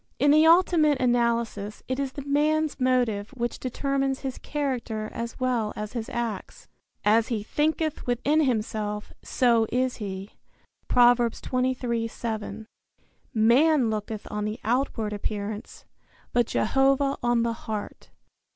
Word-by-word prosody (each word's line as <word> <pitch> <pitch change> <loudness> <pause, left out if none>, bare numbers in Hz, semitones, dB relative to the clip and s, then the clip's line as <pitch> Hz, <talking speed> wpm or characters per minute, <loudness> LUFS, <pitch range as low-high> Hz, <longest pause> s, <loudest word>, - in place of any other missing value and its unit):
In 285 - +4
the 310 +2 +6
ultimate 330 -4 +4
analysis 235 -4 0
it 260 +1 -2
is 275 -1 -2
the 280 - -6
man's 300 +1 +1
motive 245 -5 +1
which 240 0 -2
determines 270 +1 -1
his 265 -2 -5
character 245 -7 -3
as 235 0 -5
well 245 -4 0
as 210 +1 -5
his 230 -2 -4
acts. 230 -5 -5 0.4
"As 220 +2 +4
he 225 -5 -2
thinketh 310 +5 -1
within 275 +6 +2
himself, 215 -5 -2
so 235 -3 +2
is 255 +1 0
he." 195 -2 -6 0.6
Prov. 245 0 +6
23:7. 235 -3 -2 0.7
"Man 245 +3 +4
looketh 215 0 -4
on 210 0 -2
the 215 +1 -4
outward 230 -3 0
appearance, 210 +1 -5 0.5
but 240 -1 +3
Jehovah 275 +3 +2
on 240 -1 +2
the 235 0 0
heart." 215 -2 -6
240 Hz, 125 wpm, -26 LUFS, 220-270 Hz, 0.7 s, the